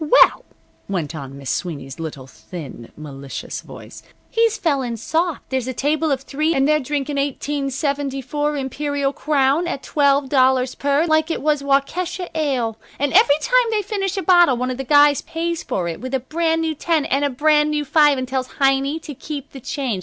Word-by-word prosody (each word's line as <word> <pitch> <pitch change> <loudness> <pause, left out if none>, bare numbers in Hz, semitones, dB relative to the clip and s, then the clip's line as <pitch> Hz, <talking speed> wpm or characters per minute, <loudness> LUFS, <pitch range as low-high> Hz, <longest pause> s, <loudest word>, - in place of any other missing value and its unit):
"Well," - - -1 0.5
went 175 -6 -2
on 140 -3 -8
Miss 135 -2 -4
Sweeney's 145 -5 -4
little 150 -5 -6
thin, 125 +1 -10
malicious 140 -3 -7
voice, - - -12 0.3
"he's 455 -1 +2
fell 290 -5 +1
in 235 -2 -3
soft. 325 - -2
There's 260 -2 -1
a 260 - -4
table 310 +4 0
of 270 -1 0
three, 305 +4 -1
and 270 0 +3
they're 305 0 +3
drinkin' 285 +1 -3
1874 280 0 -2
Imperial 280 +1 -2
Crown 290 +3 +1
at 280 - -4
twelve 280 -1 +2
dollars 260 -1 +3
per, 285 +3 +1
like 315 0 +2
it 325 - -3
was 300 -1 +2
Waukesha 330 +6 -1
ale. 255 -8 -1 0.2
And 285 0 -1
every 285 0 +6
time - - +3
they 430 -2 0
finish 390 -1 -2
a 385 - -1
bottle 350 -8 +5
one 255 +1 -1
of 250 - -5
the 270 - -3
guys 290 +1 +5
pays 335 0 -3
for 175 -2 -2
it 165 - -5
with 255 +1 -3
a - - +1
brand 325 +5 0
new 320 -1 0
ten 315 0 0
and 275 +2 0
a 285 - +2
brand 300 +3 +3
new 300 -1 -1
five 295 0 +4
and 255 0 -3
tells 260 0 -2
Heiny 275 +2 +2
to 295 - -7
keep 285 +1 -7
the 270 - -9
change. 250 -6 -3
280 Hz, 190 wpm, -20 LUFS, 255-310 Hz, 0.5 s, every